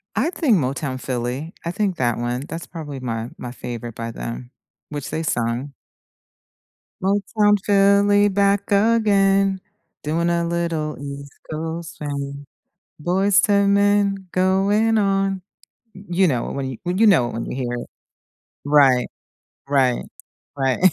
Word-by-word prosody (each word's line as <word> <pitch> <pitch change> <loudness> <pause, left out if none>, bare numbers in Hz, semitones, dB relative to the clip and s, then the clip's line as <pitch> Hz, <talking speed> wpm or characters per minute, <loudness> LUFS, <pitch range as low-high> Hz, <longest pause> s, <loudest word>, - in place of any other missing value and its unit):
I 260 +10 +1
think 265 - +2
Motown 130 -2 -2
Philly. 130 +5 -3
I 170 - -1
think 195 -1 -1
that 120 -2 +1
one. 120 +2 -2
That's 165 +1 -6
probably 150 -5 -7
my 115 -2 -4
my 125 - -6
favorite 120 -2 -7
by 115 0 -5
them, 120 +2 -7 0.4
which 145 -2 -5
they 160 - -3
sung. 120 0 -2 1.3
Motown 205 +1 +2
Philly 205 0 +4
back 200 0 +1
again, 200 -3 +3 0.4
doing 165 +3 0
a 170 0 +1
little 170 -3 -2
East 140 0 -7 0.2
Coast 160 +1 -5
swing, 140 -1 -5 0.6
Boyz 190 +4 +3
II 200 0 +4
Men 200 -1 +2
going 195 +5 +2
on 195 -2 +1 0.5
You 190 -1 0
know, 125 -5 -1
when 135 -1 -3
you 125 - -7
well, 180 +1 -1
you 225 - +4
know 165 - +5
it - - -8
when 115 - -4
you - - -5
hear 125 -2 -3
it. 120 - -5 0.8
Right. 140 -4 +4 0.6
Right. 135 -3 +2 0.5
Right. 135 -2 +1
165 Hz, 140 wpm, -21 LUFS, 130-200 Hz, 1.3 s, know